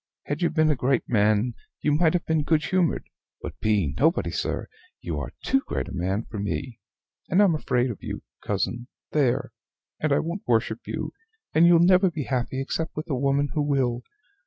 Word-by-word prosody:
Had 145 +3 -3
you 170 - +3
been 155 -1 +3
a - - +2
great 130 -1 +1
man, 110 +1 +2 0.3
you 150 - +2
might 160 +2 +3
have 180 - 0
been 160 -1 +1
good 155 +1 +1
humored; 185 -3 +1 0.3
but - - -8
being 100 -10 +1
nobody, 160 +6 +2
sir, - - -2 0.3
you - - -4
are - - -5
too 270 - +2
great - - -2
a - - -8
man 95 +4 -1
for 110 - -7
me; 100 +4 -3 0.5
and 180 - +3
I'm 200 -4 +5
afraid 125 -5 0
of 105 - -9
you, - - -6 0.2
cousin 120 0 -2 0.2
there! 135 -5 +1 0.5
and 155 - 0
I 140 - +4
won't 170 +5 -3
worship 115 - 0
you, - - -4 0.4
and 165 +2 +6
you'll 170 -1 +6
never 185 +1 +5
be 160 -4 -4
happy 130 0 -2
except 160 +4 -3
with 155 +1 -5
a - - +1
woman 140 +2 +1
who 150 - +1
will. 135 -4 +1
145 Hz, 195 wpm, -25 LUFS, 120-160 Hz, 0.5 s, and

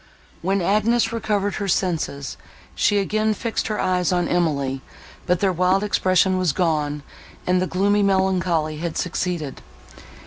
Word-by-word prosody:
When 190 +1 0
Agnes 225 +4 +2
recovered 205 -3 -1
her 200 - -1
senses, 165 -7 -1 0.4
she 205 - +2
again 215 +2 +1
fixed 230 +2 -2
her 215 -1 -2
eyes 180 -1 +1
on 175 -1 +1
Emily, 140 -6 0 0.5
but 180 -1 +1
their 195 -2 +2
wild 185 +3 +2
expression 185 -2 +2
was 180 -6 +1
gone, 150 -4 0 0.4
and 180 0 +2
a 185 - 0
gloomy 200 +3 +2
melancholy 185 -5 +1
had 170 -1 -3
succeeded. 175 -5 -3
185 Hz, 140 wpm, -22 LUFS, 170-200 Hz, 0.5 s, Agnes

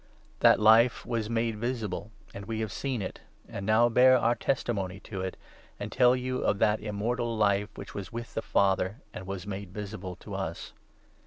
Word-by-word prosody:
That - - +6
Life 110 +3 +5
was 115 -3 -2
made 115 -1 0
visible, 110 -4 -3 0.2
2 - - -9
and 100 - -8
we 110 -1 -3
have 110 -3 -3
seen 130 -1 -2
it, 95 - -7 0.3
and 100 - -6
now 110 +2 +5
bear 130 +2 +6
our 120 -1 +3
testimony 105 -6 -2
to 95 -3 -6
it, 95 0 -4 0.4
and - - -5
tell 125 0 +5
you 130 0 -2
of 105 - +1
that 105 +1 +2
Immortal 115 +3 -2
Life, 105 -1 +2
which 100 - -9
was 100 -3 -6
with 120 0 -6
the - - -2
Father 100 +4 +1
and 95 - -8
was 95 -1 -5
made 100 -2 -6
visible 100 -2 -6
to - - -10
us. - - -5
110 Hz, 190 wpm, -29 LUFS, 100-120 Hz, 0.4 s, That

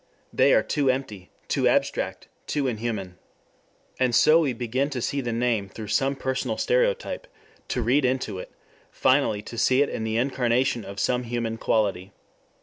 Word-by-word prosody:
They - - +4
are - - +3
too 140 -3 0
empty, 110 -8 -3 0.2
too - - +1
abstract, - - 0 0.2
too 145 -2 -1
inhuman. 110 -7 -3 0.8
And 125 -2 +2
so 155 +2 +6
we 150 -5 +1
begin 125 +4 -1
to 135 -3 -4
see 140 +4 -1
the 120 -2 -3
name 115 -4 0
through 105 +1 -8
some 135 +2 +1
personal 130 -1 -2
stereotype, - - 0 0.4
to 125 - -1
read 130 +6 +3
into 125 -6 -1
it, - - -9 0.4
finally 130 -6 +2
to 115 +1 -6
see 130 +2 +4
in 145 - -3
it 110 - -4
the 110 0 -1
incarnation 125 -1 +1
of 100 0 -7
some 125 +3 +1
human 115 -1 -3
quality. 100 -3 0
125 Hz, 165 wpm, -25 LUFS, 110-135 Hz, 0.8 s, so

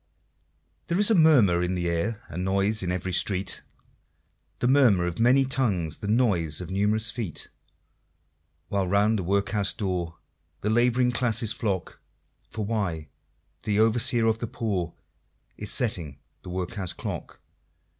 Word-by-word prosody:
There's 200 +4 +3
a - - +6
murmur 135 - +5
in 90 +1 -1
the 90 -1 -2
air, 100 +7 -2
And 90 +2 -5
noise 100 +3 +1
in 90 -1 -2
every 90 0 -3
street 95 +1 0 1.0
The 120 - 0
murmur 125 -10 +4
of 90 +2 -4
many 130 +4 +4
tongues, 100 - 0
The 100 - -6
noise 100 -10 +1
of 90 0 -7
numerous 105 +3 +1
feet 105 -10 -5 1.2
While 100 -2 0
round 100 +3 +2
the - - -3
Workhouse 100 +2 0
door 90 -5 -3 0.4
The 105 - 0
Laboring 125 +2 +3
Classes 115 -3 0
flock, 100 -7 -3 0.5
For 110 -2 -4
why? 90 -9 -3 0.5
the 105 0 -1
Overseer 115 +2 +3
of 110 0 +1
the 120 - -3
Poor 95 -8 -3 0.6
Is 105 - -5
setting 85 - 0 0.2
the - - -10
Workhouse 90 +1 -4
Clock. - - -7
100 Hz, 140 wpm, -26 LUFS, 90-115 Hz, 1.2 s, a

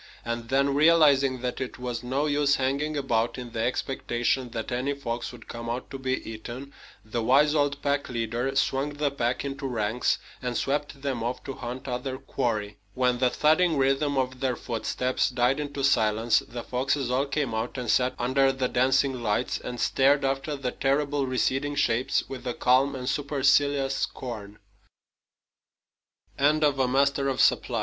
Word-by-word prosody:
And 115 0 -4
then, 140 +1 +2
realizing 140 -4 +4
that 125 +1 -3
it 130 - -5
was 125 -2 -4
no 130 +4 -1
use 145 -1 +2
hanging 140 +3 -1
about 120 -4 0
in 125 -2 -7
the 115 - -5
expectation 125 0 -1
that 115 +1 -5
any 130 +4 -1
fox 120 -4 -4
would 125 - -13
come 115 0 -6
out 120 +2 -4
to 135 - -6
be 130 0 -2
eaten, 120 +5 -8 0.3
the 115 +2 -2
wise 140 +6 +4
old 145 -2 +1
pack 140 0 0
leader 120 +2 -2
swung 135 +2 0
the 145 -1 0
pack 125 -1 -1
into 135 0 -4
ranks 115 -1 0 0.2
and 125 -2 -2
swept 140 0 -2
them 130 -5 -2
off 120 +2 -3
to 135 - -5
hunt 125 +2 -7
other 130 +1 -3
quarry. 110 -6 -3 0.2
When 125 -1 +1
the 125 -1 +3
thudding 155 +4 +3
rhythm 135 +1 +1
of 130 -1 -1
their 130 -2 0
footsteps 125 +3 -1
died 125 +2 +1
into 145 -2 -4
silence, 110 -3 +3
the 120 0 -8
foxes 130 0 -1
all 135 +3 +1
came 140 -4 -1
out 110 +4 -3
and 125 -1 -4
sat 125 +3 +2
under 135 +2 +2
the 130 -1 -1
dancing 130 0 +2
lights, 110 +2 0
and 120 - -6
stared 140 +1 +3
after 135 +2 -1
the 135 -3 -3
terrible 140 0 0
recedin 135 +3 0
130 Hz, 145 wpm, -26 LUFS, 120-140 Hz, 0.3 s, realizing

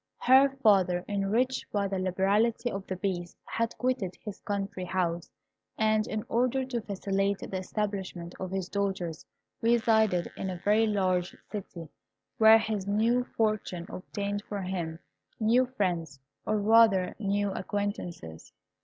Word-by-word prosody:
Her 265 +2 +6
father, 185 -4 +4
enriched 215 +6 0
by 200 -1 0
the 195 -1 -2
liberality 200 +6 +1
of 195 0 -5
the 185 - -3
Beast, 180 -2 -3
had 230 0 -2
quitted 250 -8 -1
his 210 -3 -8
country 200 -2 -3
house, 175 -2 -1 0.5
and 215 0 +2
in 215 -1 -3
order 255 +2 +1
to 245 -3 -3
facilitate 195 -1 -2
the 190 - -2
establishment 190 -3 -4
of 185 - -4
his 190 -1 -3
daughters, 190 -5 -3 0.3
resided 220 -5 +3
in 190 - -4
a 180 - -4
very 210 +5 +3
large 185 -4 0
city, 180 -5 -6 0.5
where 220 0 +9
his 215 -3 -2
new 230 +5 +2
fortune 215 -6 0
obtained 200 +2 -4
for 200 -2 -3
him 175 -3 -3 0.4
new 240 +3 +3
friends, 175 - -2 0.3
or 215 - +2
rather 210 -3 +5
new 205 -1 0
acquaintances. 185 - -4
200 Hz, 135 wpm, -29 LUFS, 185-220 Hz, 0.5 s, where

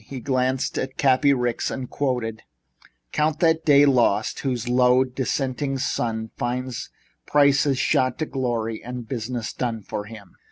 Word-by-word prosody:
He 130 +4 -7
glanced 130 0 0
at 135 0 -4
Cappy 135 +1 +4
Ricks 125 -3 0
and 130 -1 -5
quoted: 120 -6 -2 0.7
"Count 155 +1 0
that 160 -1 +3
day 145 -1 +6
lost 120 -6 +2
whose 125 -3 -2
low 125 +1 +4
descending 135 +1 -2
sun 115 -4 -2
Finds 125 +1 -3 0.4
prices 140 -1 +3
shot 130 0 +1
to 155 - -1
glory 120 -5 -2
and 125 -1 -7
business 120 -1 -4
done 115 -4 -3
for 105 +1 -5
fun." 105 -3 -12
125 Hz, 145 wpm, -23 LUFS, 120-135 Hz, 0.7 s, day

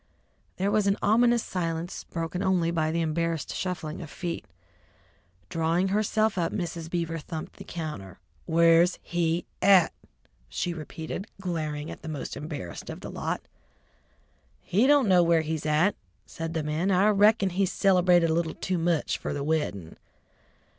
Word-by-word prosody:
There 195 +2 0
was 210 -1 +2
an 200 - +2
ominous 235 +2 +4
silence, 170 -1 -3
broken 165 +2 -4
only 180 -3 +2
by 160 -2 0
the 165 +1 0
embarrassed 165 -1 -1
shuffling 180 -4 -4
of 160 - -8
feet. 170 +2 -5 1.0
Drawing 165 +3 +1
herself 215 0 +1
up, 170 - 0
Mrs. 170 -3 -4
Beaver 165 -1 -2
thumped 155 +1 -7
the - - -9
counter. 150 - -6 0.3
"Where's 170 +1 +5
he 170 0 0 0.2
at?" 190 -3 +6 0.6
she 175 - -2
repeated, 160 +4 -6
glaring 155 -5 -3
at - - -9
the 160 - -7
most 150 -2 -5
embarrassed 145 - -6
of - - -7
the - - -7
lot. - - -3 1.2
"He 215 +8 +2
don't 285 -4 +5
know 180 -2 +6
where 170 -1 +4
he's 155 -1 -3
at," 155 +7 +3 0.3
said 165 0 -6
the 160 - 0
man. 155 +5 -1
"I 190 +1 +4
rickon 205 -1 +4
he 190 +2 +1
cilebrated 180 -3 +4
a - - +2
little 165 -1 -1
too 185 -2 -2
much 165 -2 0
fer - - -3
the 145 - -3
weddin'." 145 - -2
170 Hz, 155 wpm, -27 LUFS, 160-190 Hz, 1.2 s, at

